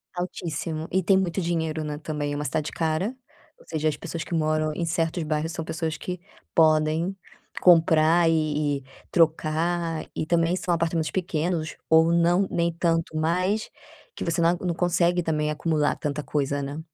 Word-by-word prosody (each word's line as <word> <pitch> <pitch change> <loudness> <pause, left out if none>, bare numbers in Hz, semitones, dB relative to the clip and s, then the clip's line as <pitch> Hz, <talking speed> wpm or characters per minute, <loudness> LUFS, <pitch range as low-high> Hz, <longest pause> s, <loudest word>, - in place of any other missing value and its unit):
Altíssimo. 165 -2 -4
E 190 +1 +1
tem 190 +2 +4
muito 190 0 0
dinheiro, 160 -2 -1
né, 150 -1 -4
também. 150 -1 -3
Uma 145 +1 -3
cidade 150 +3 -2
cara, 165 +8 -1 0.5
ou - - -19
seja, 155 -1 0
as 150 - -4
pessoas 165 0 -5
que - - -7
moram 155 -1 +1
em 170 +2 -2
certos 165 0 -1
bairros 155 +1 -1
são 165 -1 -5
pessoas 160 -1 -3
que 180 +1 -5 0.3
podem 160 +3 +3 0.5
comprar 165 -1 +5
e 150 -2 +1
e 135 - -19 0.3
trocar. 165 0 +1
E - - -2
também 170 +1 +2
são 180 -1 -1
apartamentos 165 -1 0
pequenos, 170 -2 -2
ou 160 +1 +5
não, 175 +3 +3
nem 170 0 +1
tanto, 165 -1 0
mas 185 +7 0 0.5
que - - -5
você 170 0 -1
não 165 - +5
a 175 +1 -4
não 175 - +1
consegue 175 0 +2
também 150 -2 0
acumular 150 -1 0
tanta 145 0 -3
coisa, 145 -1 -1
né. 140 +2 -5
165 Hz, 170 wpm, -25 LUFS, 155-170 Hz, 0.5 s, comprar